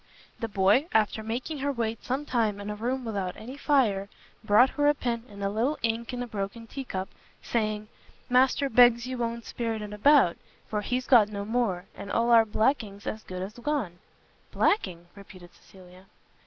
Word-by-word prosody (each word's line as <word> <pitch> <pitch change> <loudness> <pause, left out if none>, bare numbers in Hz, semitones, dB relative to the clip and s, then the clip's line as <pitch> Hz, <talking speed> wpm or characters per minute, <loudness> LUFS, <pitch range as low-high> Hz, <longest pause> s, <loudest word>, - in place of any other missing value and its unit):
The 230 - -2
boy, 205 - +3
after 220 0 +2
making 245 +7 -4
her 285 +1 0
wait 230 -3 -3
some 270 +4 -2
time 225 -6 0
in 205 +1 -5
a - - -4
room 245 +4 -2
without 195 -5 -3
any 245 +5 -8
fire, 230 -10 +1 0.3
brought 215 +5 +5
her 290 0 +1
a 295 - +4
pen 235 -3 -3
and 200 -1 -8
a 195 - +1
little 240 +8 0
ink 230 +1 -1
in 245 -1 -3
a - - -6
broken 210 +1 -5
tea 270 +4 -6
cup, 190 -4 -4 0.4
saying 215 -2 -1 0.4
"Master 260 +2 +3
begs 240 -1 +5
you 255 -1 -5
won't 235 0 -3
spirt 230 -2 -3
it 210 0 -7
about, 230 - +4 0.3
for 210 -1 -2
he's 250 +4 -2
got 225 -5 +6
no 200 -1 -5
more; 215 -6 -1
and 200 - -8
all 235 +1 +2
our 230 -1 +7
blacking's 215 -2 -1
as 215 - -4
good 185 -3 -6
as 195 +3 -7
gone." 240 - -2 0.5
"Blacking?" 175 - 0
repeated 185 -3 -14
Cecilia. 185 0 -17
225 Hz, 185 wpm, -27 LUFS, 200-250 Hz, 0.5 s, our